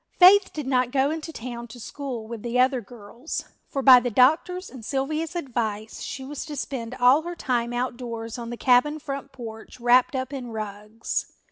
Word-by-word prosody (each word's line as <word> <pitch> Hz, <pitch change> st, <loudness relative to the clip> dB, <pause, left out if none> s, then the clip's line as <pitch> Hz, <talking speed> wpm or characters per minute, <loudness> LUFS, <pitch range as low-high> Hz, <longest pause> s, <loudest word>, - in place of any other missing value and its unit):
Faith 380 Hz, +2 st, +8 dB
did 300 Hz, -3 st, -5 dB
not 255 Hz, -2 st, +2 dB
go 270 Hz, +2 st, +2 dB
into 320 Hz, 0 st, -5 dB
town 240 Hz, -3 st, -7 dB
to 240 Hz, +2 st, -12 dB
school 250 Hz, -2 st, -6 dB
with 230 Hz, -1 st, -7 dB
the 240 Hz, +2 st, -1 dB
other 255 Hz, 0 st, +3 dB
girls, 235 Hz, +6 st, -7 dB, 0.2 s
for 275 Hz, -, -3 dB
by 255 Hz, -2 st, +10 dB
the 245 Hz, 0 st, -2 dB
doctor's 315 Hz, -, +3 dB
and 255 Hz, -4 st, -11 dB
Sylvia's 305 Hz, +7 st, -2 dB
advice 225 Hz, -8 st, -3 dB
she 265 Hz, -, -5 dB
was 290 Hz, +1 st, -5 dB
to 300 Hz, -, -6 dB
spend 250 Hz, -3 st, -4 dB
all 255 Hz, +4 st, +5 dB
her 345 Hz, +2 st, -6 dB
time 240 Hz, -6 st, -1 dB
outdoors 240 Hz, -2 st, -4 dB
on 235 Hz, -1 st, -6 dB
the 240 Hz, -, -5 dB
cabin 260 Hz, +5 st, +4 dB
front 275 Hz, -2 st, -6 dB
porch 225 Hz, -1 st, -9 dB
wrapped 245 Hz, +3 st, +4 dB
up 260 Hz, +2 st, -3 dB
in 255 Hz, -3 st, -5 dB
rugs. 215 Hz, 0 st, -4 dB
250 Hz, 190 wpm, -25 LUFS, 235-280 Hz, 0.2 s, by